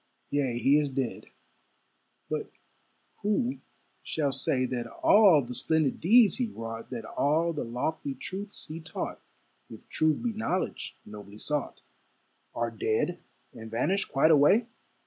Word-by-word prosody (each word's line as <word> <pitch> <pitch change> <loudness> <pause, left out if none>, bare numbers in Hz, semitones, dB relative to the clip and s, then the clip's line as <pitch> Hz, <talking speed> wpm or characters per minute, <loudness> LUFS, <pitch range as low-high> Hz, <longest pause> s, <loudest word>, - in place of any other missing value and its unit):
Yea, 135 -4 0
he 135 +5 +4
is 145 -2 -1
dead; 130 -3 -3 1.0
but - - -3 0.7
who 235 +6 0 0.4
shall 145 -3 -1
say 130 -1 +1
That 120 -2 -3
all 185 - +5
the 125 +1 -7
splendid 155 +3 +1
deeds 215 +2 +5
he 250 -2 0
wrought, 115 - -7
That 115 -4 -6
all 160 +7 +1
the 150 - -3
lofty 135 +4 -3
truths 200 +2 -6
he 155 +2 -7
taught 160 0 -5 0.5
(If - - -12
truth 155 +6 +1
be 240 -2 -1
knowledge 190 -4 -2
nobly 105 -1 -11
sought), 150 +5 -3 0.7
Are 115 0 -1
dead 115 +10 -1 0.3
and 110 0 -9
vanished 155 - 0
quite 150 +3 +4
away? 160 +10 +5
145 Hz, 135 wpm, -28 LUFS, 120-180 Hz, 1.0 s, all